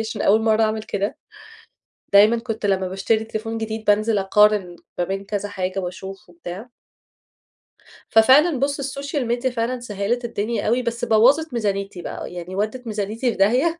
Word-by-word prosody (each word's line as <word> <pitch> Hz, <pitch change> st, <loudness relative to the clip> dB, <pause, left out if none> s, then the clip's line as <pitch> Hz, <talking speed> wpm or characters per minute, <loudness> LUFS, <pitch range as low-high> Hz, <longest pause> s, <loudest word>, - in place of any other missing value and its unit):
عشان 220 Hz, 0 st, -3 dB
أول 220 Hz, +2 st, +4 dB
مرة 220 Hz, 0 st, +3 dB
أعمل 215 Hz, 0 st, 0 dB
كده. 205 Hz, 0 st, -3 dB, 1.0 s
دايمًا 210 Hz, +4 st, +6 dB
كنت 225 Hz, -2 st, -4 dB
لما 190 Hz, -1 st, +1 dB
باشتري 215 Hz, +4 st, 0 dB
تليفون 225 Hz, 0 st, -4 dB
جديد 220 Hz, 0 st, -4 dB
بانزل 210 Hz, +1 st, +2 dB
أقارن 195 Hz, -2 st, +3 dB, 0.2 s
ما 175 Hz, -, +1 dB
بين 195 Hz, +2 st, -4 dB
كذا 205 Hz, 0 st, -3 dB
حاجة 190 Hz, -1 st, -3 dB
وأشوف 190 Hz, +1 st, -8 dB
وبتاع. 175 Hz, +6 st, -9 dB, 1.4 s
ففعلًا 265 Hz, +6 st, +5 dB
بُص 280 Hz, +1 st, 0 dB
السوشيال 275 Hz, -1 st, -3 dB
ميديا 245 Hz, +2 st, 0 dB
فعلًا 245 Hz, +1 st, -2 dB
سهلِت 235 Hz, +2 st, -2 dB
الدنيا 215 Hz, -1 st, -2 dB
أوي 240 Hz, +3 st, +2 dB
بس 235 Hz, 0 st, -3 dB
بوظت 255 Hz, +7 st, +4 dB
ميزانيتي، 200 Hz, -4 st, -2 dB
بقى 175 Hz, -, -7 dB
يعني 180 Hz, +1 st, -7 dB
ودِت 220 Hz, +4 st, -3 dB
ميزانيتي 220 Hz, +3 st, -2 dB
في -, -, -8 dB
داهية. 260 Hz, -, +2 dB
220 Hz, 155 wpm, -22 LUFS, 200-240 Hz, 1.4 s, دايمًا